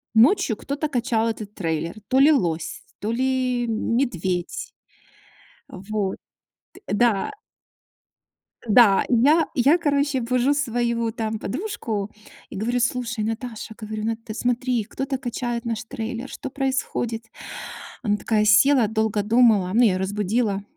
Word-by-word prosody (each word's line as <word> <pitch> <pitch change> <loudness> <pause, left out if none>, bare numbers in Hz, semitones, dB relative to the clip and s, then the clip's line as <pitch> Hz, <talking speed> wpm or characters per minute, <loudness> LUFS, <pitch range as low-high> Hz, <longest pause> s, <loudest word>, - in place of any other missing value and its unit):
ночью 245 - +4
кто-то 285 +5 -3
качал 240 -4 0
этот 215 -2 -6
трейлер, 165 -2 -2
то 260 - +1
ли 285 +3 +7
лось, 165 - -1 0.2
то 215 - -2
ли 255 0 0
медведь. 225 - -1 1.0
Вот. 195 0 -3 0.6
Т - - -16
да. 230 - +2 1.4
Да, 210 -3 +6
и - - +2
я 300 +7 +4
и 250 - 0
я, 285 +7 +5
короче, 285 -4 +1
бужу 250 +3 +1
свою 235 -4 0
там 220 -1 -3
подружку 220 - -4 0.4
и - - -9
говорю: 235 +5 0
"Слушай, 245 -2 -1
Наташа". 225 0 -5
Говорю: 215 -1 -5
"Нат, 225 0 -2
ты 215 - -6
смотри, 245 -1 0
кто-то 270 +5 -4
качает 240 -2 -3
наш 230 0 -2
трейлер, 230 +2 -5
что 275 - -6
происходит?" 260 -4 -2 0.8
Она 205 -4 +1
такая 210 0 +1
села, 235 +4 +5
долго 220 -1 0
думала- 215 -4 +4
ну, 235 - +4
я 215 -6 +4
её - - -1
разбудила. 205 +2 -1
230 Hz, 135 wpm, -23 LUFS, 215-255 Hz, 1.4 s, ли